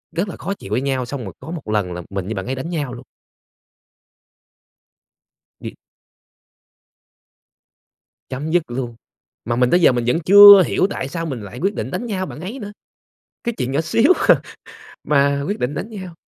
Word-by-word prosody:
rất 180 Hz, +5 st, -1 dB
là -, -, -7 dB
khó 195 Hz, -, -4 dB
chịu 105 Hz, -, -11 dB
với 120 Hz, -, 0 dB
nhau 135 Hz, -2 st, -1 dB
xong 125 Hz, 0 st, -6 dB
rồi 95 Hz, -4 st, -8 dB
có 160 Hz, -, -9 dB
một 165 Hz, -8 st, -7 dB
lần 105 Hz, -4 st, -1 dB
là 90 Hz, -, -6 dB
mình 95 Hz, -2 st, -4 dB
với 110 Hz, -, -4 dB
bạn 95 Hz, -2 st, -5 dB
ấy 130 Hz, -, -3 dB
đánh 130 Hz, +5 st, -6 dB
nhau 145 Hz, -7 st, -3 dB
luôn. 125 Hz, +1 st, -10 dB, 2.6 s
Bị -, -, -8 dB, 2.5 s
Chấm 140 Hz, +5 st, -4 dB
dứt 175 Hz, 0 st, +2 dB
luôn. 120 Hz, -2 st, -5 dB, 0.5 s
Mà 120 Hz, +1 st, -2 dB
mình 125 Hz, 0 st, +2 dB
tới 175 Hz, -, +4 dB
giờ 165 Hz, -, +5 dB
mình 120 Hz, -1 st, -1 dB
vẫn 160 Hz, +8 st, +1 dB
chưa 200 Hz, +2 st, +9 dB
hiểu -, -, +1 dB
tại 130 Hz, -, -4 dB
sao 165 Hz, +3 st, -4 dB
mình 135 Hz, -7 st, -5 dB
lại 105 Hz, +5 st, -9 dB
quyết 195 Hz, +3 st, 0 dB
định -, -, -4 dB
đánh 240 Hz, -, -4 dB
nhau 190 Hz, -4 st, -3 dB
bạn 150 Hz, -, -9 dB
ấy 205 Hz, +10 st, -6 dB
nữa. 205 Hz, -2 st, -8 dB, 0.7 s
Cái 235 Hz, -, -2 dB
chuyện 125 Hz, +2 st, -2 dB
nhỏ 140 Hz, -, +1 dB
xíu 230 Hz, -, +3 dB, 0.2 s
à -, -, +5 dB, 0.6 s
mà 140 Hz, -1 st, +2 dB
quyết 205 Hz, -, -3 dB
định 125 Hz, +4 st, -2 dB
đánh 210 Hz, -, -5 dB
nhau. 185 Hz, -5 st, -8 dB
140 Hz, 190 wpm, -20 LUFS, 125-185 Hz, 2.6 s, chưa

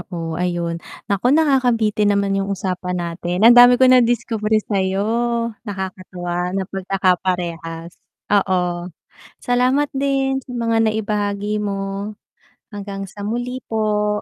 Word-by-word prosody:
oo, 170 Hz, -3 st, -6 dB
ayun. 170 Hz, -1 st, -2 dB, 0.2 s
Naku, 200 Hz, +5 st, 0 dB
nakakabitin 245 Hz, -8 st, +2 dB
naman 200 Hz, 0 st, 0 dB
yung 195 Hz, -, -3 dB
usapan 185 Hz, -2 st, -3 dB
natin, 175 Hz, +2 st, -2 dB
ang 235 Hz, -, +9 dB
dami 245 Hz, 0 st, +8 dB
ko 260 Hz, -, +4 dB
nadiskubre 235 Hz, -3 st, +3 dB
sayo. 195 Hz, -1 st, 0 dB, 0.6 s
Nakakatuwa 185 Hz, -2 st, -4 dB
na 190 Hz, -, -1 dB
pagkakaparehas, 180 Hz, -3 st, -2 dB, 0.4 s
oo. 180 Hz, -3 st, +1 dB, 0.5 s
Salamat 255 Hz, +4 st, +1 dB
din 270 Hz, -1 st, 0 dB
sa 260 Hz, -, -15 dB
mga 230 Hz, -1 st, 0 dB
naibahagi 210 Hz, -1 st, -1 dB
mo. 200 Hz, 0 st, -4 dB, 0.6 s
Hanggang 200 Hz, -1 st, -6 dB
sa 200 Hz, +2 st, -9 dB
muli 245 Hz, +4 st, -3 dB
po. 210 Hz, -1 st, 0 dB
200 Hz, 115 wpm, -20 LUFS, 180-230 Hz, 0.6 s, ang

